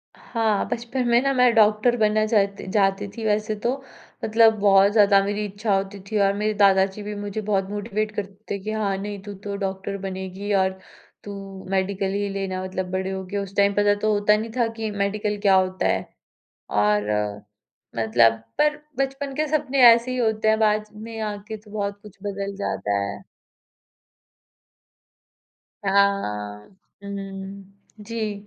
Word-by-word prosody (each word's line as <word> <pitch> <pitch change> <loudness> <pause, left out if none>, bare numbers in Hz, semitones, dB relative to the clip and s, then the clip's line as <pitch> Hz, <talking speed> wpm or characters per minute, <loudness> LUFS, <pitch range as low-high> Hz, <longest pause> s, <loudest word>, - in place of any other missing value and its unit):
हाँ, 220 -4 -1
बचपन 245 +1 -2
में 235 0 +4
ना 275 +1 +1
मैं 250 -2 +4
डॉक्टर 215 +2 +4
बनना 215 -1 +2
चाहती 200 -3 +1
जाती 195 -1 +2
थी 225 - -4
वैसे 215 +1 0
तो, 245 +6 -2 0.4
मतलब 225 0 +5
बहुत 200 0 +5
ज़्यादा 205 -2 +5
मेरी 205 +1 -2
इच्छा 205 +1 -1
होती 195 +1 -3
थी। 215 - -1
और 195 0 +3
मेरे 210 +1 -1
दादाजी 195 0 +3
भी 210 - -5
मुझे 205 +1 -4
बहुत 195 -1 +1
मोटिवेट 210 +1 -2
करते 200 0 -6
थे 200 - -1
कि 215 - -3
हाँ, 210 -3 -1
नहीं 200 0 -5
तू 205 0 -7
तो 200 -1 -4
डॉक्टर 195 0 -3
बनेगी, 190 +2 -5
और 190 -1 +1 0.4
तू 195 -1 -8
मेडिकल 195 0 0
ही 205 0 -1
लेना 195 -1 -3
मतलब 185 0 -4
बड़े 190 +1 -2
होके। 190 +1 -4
उस 200 -1 -5
टाइम 200 0 +3
पता 205 0 +3
तो 215 - +2
होता 210 +1 +3
नहीं 220 +1 -4
था 240 -2 +3
कि 220 -1 -2
मेडिकल 205 +1 -1
क्या 195 -2 +5
होता 185 0 +1
है? - - 0 0.7
और, 105 0 +2 0.9
मतलब 115 0 +4 0.3
पर 300 0 +3 0.2
बचपन 270 0 -2
के 310 +1 +1
सपने 275 -2 -1
ऐसे 235 +2 +1
ही 255 - -2
होते 220 -2 +1
हैं 220 0 +4
बाद 215 -1 +2
में 225 +1 -8
आके 210 0 -4
तो 210 0 -17
बहुत 200 -1 -3
कुछ 210 -3 -14
बदल 200 -1 -4
जाता 105 - -2
है। 100 0 -5 2.6
हाँ। 105 - 0 0.4
हुँ, 200 - -6
हुँ, 195 0 -7 0.4
जी। 220 -1 -3
205 Hz, 165 wpm, -23 LUFS, 195-215 Hz, 2.6 s, मतलब